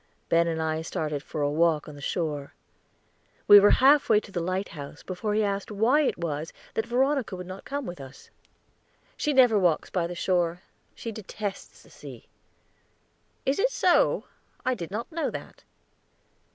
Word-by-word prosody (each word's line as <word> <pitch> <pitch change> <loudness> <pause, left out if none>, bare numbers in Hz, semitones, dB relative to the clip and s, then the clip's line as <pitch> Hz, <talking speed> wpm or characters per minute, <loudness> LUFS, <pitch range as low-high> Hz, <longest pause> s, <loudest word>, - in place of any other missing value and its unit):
Ben 170 0 +3
and 165 -1 -2
I 160 0 -1
started 155 -3 -3
for 150 +1 -4
a 145 - +1
walk 160 0 +2
on 150 - -9
the 145 - -12
shore. 150 -3 -3 0.9
We 205 - +11
were 205 +1 +6
half 280 +2 +5
way 215 -2 +6
to 205 - -13
the 180 - -2
lighthouse 170 -5 -4
before 210 +3 -3
he 215 - +2
asked 200 -1 -2
why 225 +8 +3
it 290 - 0
was 160 -1 -4 0.2
that 220 +1 -2
Veronica 260 -2 +1
would 180 0 -7
not 185 +2 -9
come 285 -1 -4
with 175 -7 -7
us. 135 +1 -13 0.8
"She 300 - -1
never 250 -6 +5
walks 175 -5 +1
by 175 -3 0
the 175 - -6
shore; 175 0 0 0.3
she 230 - -6
detests 205 -1 -7
the - - -20
sea." - - -11 1.2
"Is 270 +5 +1
it - - +3
so? 370 -7 +3 0.4
I 255 - +2
did 170 -9 -6
not 220 - -5
know 325 0 -1
that." - - -9
185 Hz, 175 wpm, -27 LUFS, 165-230 Hz, 1.2 s, We